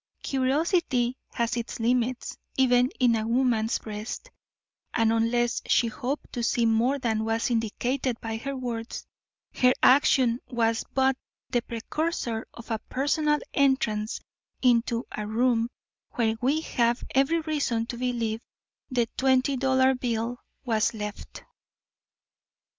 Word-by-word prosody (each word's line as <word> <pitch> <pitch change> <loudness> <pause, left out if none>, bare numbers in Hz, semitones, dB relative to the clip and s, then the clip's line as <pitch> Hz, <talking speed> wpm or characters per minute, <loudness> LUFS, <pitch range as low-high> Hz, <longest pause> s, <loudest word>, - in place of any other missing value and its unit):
Curiosity 265 -2 +1 0.2
has 235 0 -1
its 235 -1 -4
limits 245 +1 0 0.2
even 250 -1 +4
in 245 -3 +4
a 220 0 -1
woman's 235 -2 +2
breast, 215 - -7 0.6
and 225 -1 +3
unless 235 +1 +1
she 235 - +3
hoped 270 +5 -4
to 240 - -2
see 235 0 +2
more 230 +5 +2
than 225 -4 -1
was 225 +2 0
indicated 240 +2 -1
by 225 -1 -4
her 275 +4 -4
words, 235 -2 -5 0.5
her 250 0 +4
action 255 -3 +5
was 230 -2 0
but 265 0 +3 0.4
the 240 - +2
precursor 235 0 -3
of 235 0 -11
a 220 - 0
personal 295 +3 +1 0.2
entrance 235 -6 +1 0.4
into 235 -1 +2
a 210 0 -4
room 230 +1 +2 0.4
where 225 -2 +1
we 280 +5 +2
have 240 -5 0
every 275 +5 +3
reason 285 -8 -1
to 235 - -5
believe 235 -2 -2 0.5
the 245 -3 +1
twenty 265 +1 +3
dollar 260 0 +3
bill 245 -1 -2 0.3
was 225 -2 +1
left. 210 -1 -7
240 Hz, 125 wpm, -27 LUFS, 230-260 Hz, 0.6 s, action